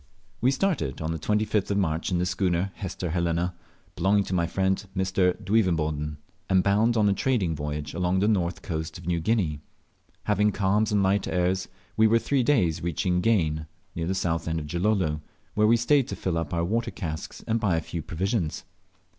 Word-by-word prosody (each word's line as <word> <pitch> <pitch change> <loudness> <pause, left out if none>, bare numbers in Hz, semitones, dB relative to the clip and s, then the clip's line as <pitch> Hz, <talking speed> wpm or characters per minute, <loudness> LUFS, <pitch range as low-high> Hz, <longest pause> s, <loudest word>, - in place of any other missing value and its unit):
We 125 - +4
started 135 - 0
on 80 0 -2
the 80 - -3
25th 105 +3 0
of 100 - +1
March 80 -4 0
in 90 - +2
the 90 - +1
schooner 90 0 0
Hester 90 -3 -4
Helena, 85 +1 0 0.4
belonging 100 +3 +3
to 95 - -5
my 85 -2 +1
friend 95 +2 0
Mr. 95 0 +1
Duivenboden, 80 -8 0 0.3
and 95 -1 +4
bound 110 +4 +3
on 105 -1 +4
a 100 - +4
trading 100 -6 0
voyage 75 0 -4
along 90 +2 0
the 100 +2 +2
north 90 -5 0
coast 80 -3 -4
of 85 - -12
New 85 -1 0
Guinea. 85 -5 0 0.6
Having 105 +1 +2
calms 105 +3 +1
and 100 -1 +3
light 95 +1 +2
airs, 90 +1 0 0.3
we 110 0 +6
were 115 +1 +4
three 130 +4 +1
days 110 - +2
reaching 90 +2 0
Gane, 80 -8 +1 0.3
near 80 0 -3
the 95 - 0
south 85 -3 -1
end 80 0 0
of 75 - -6
Gilolo, 85 -2 0 0.3
where 105 0 +3
we 115 +2 +5
stayed 130 +3 +3
to - - -4
fill 90 -3 -2
up 80 -3 -4
our 85 -1 0
water 115 +6 0
casks 80 -5 -6
and 115 +1 0
buy 100 -7 +1
a - - +2
few 85 - -5
provisions. 90 +2 -2
95 Hz, 195 wpm, -26 LUFS, 80-105 Hz, 0.6 s, we